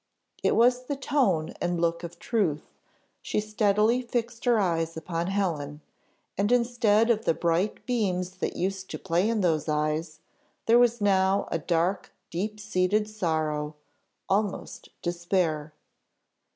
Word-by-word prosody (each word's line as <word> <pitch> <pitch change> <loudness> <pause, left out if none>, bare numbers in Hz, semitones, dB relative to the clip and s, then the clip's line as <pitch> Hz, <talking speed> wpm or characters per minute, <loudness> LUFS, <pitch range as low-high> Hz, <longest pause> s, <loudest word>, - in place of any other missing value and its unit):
It - - +2
was 250 +2 +4
the 285 - -2
tone 250 - +1
and 175 -1 0
look 170 0 0
of 170 0 -7
truth 175 -9 0 0.6
she - - -1
steadily 215 +2 +2
fixed 235 -1 -3
her 240 -2 +4
eyes 165 -4 0
upon 165 +1 -3
Helen 160 -7 -2 0.6
and 205 +3 +2
instead 235 -2 +3
of 225 -1 0
the 165 - +2
bright 170 +4 0
beams 185 -7 -1
that - - -3
used 190 +1 -3
to - - -4
play 185 +3 +1
in 225 -2 +1
those 160 -3 +1
eyes, 155 +1 -1 0.5
there 235 +1 +6
was 240 -2 +3
now 195 -1 +2
a 165 - 0
dark 175 +4 0 0.2
deep 210 +5 -3
seated 210 0 +1
sorrow, 155 -7 -2 0.5
almost 200 0 -2
despair. 170 -3 -1
190 Hz, 140 wpm, -27 LUFS, 165-215 Hz, 0.6 s, there